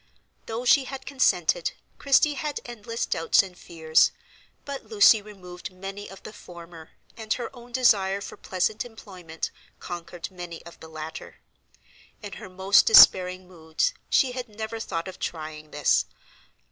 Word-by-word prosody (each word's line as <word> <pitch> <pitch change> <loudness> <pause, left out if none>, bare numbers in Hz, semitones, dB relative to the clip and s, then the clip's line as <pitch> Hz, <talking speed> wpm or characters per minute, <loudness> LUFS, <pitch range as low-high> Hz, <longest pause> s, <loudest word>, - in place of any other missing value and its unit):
Though 230 +2 -4
she 270 +2 +5
had 265 0 -8
consented, 280 - +1 0.3
Christie 285 +1 +3
had 295 0 -4
endless 230 -1 -4
doubts 165 +4 +3
and 185 -2 -11
fears, 160 -2 +2 0.5
but 280 -1 -7
Lucy 405 - +6
removed 185 -4 -10
many 195 +2 -8
of 195 - -13
the 215 - -9
former, 170 -4 -13 0.2
and 220 -1 -9
her 245 +2 -6
own 240 0 -14
desire 200 -6 +3
for 200 - -8
pleasant 195 +3 -2
employment 185 -8 -8 0.3
conquered 175 0 -7
many 175 -3 -9
of 170 - -13
the 160 - -12
latter. 155 +1 -8 0.9
In 205 -2 -7
her - - -9
most 190 +2 +4
despairing 185 -4 +7
moods 165 - -2 0.2
she 260 - +3
had 250 -1 -6
never 220 +1 -6
thought 170 -5 -4
of 185 - -9
trying 155 -2 -6
this. 150 -1 +2
195 Hz, 145 wpm, -25 LUFS, 175-235 Hz, 0.9 s, despairing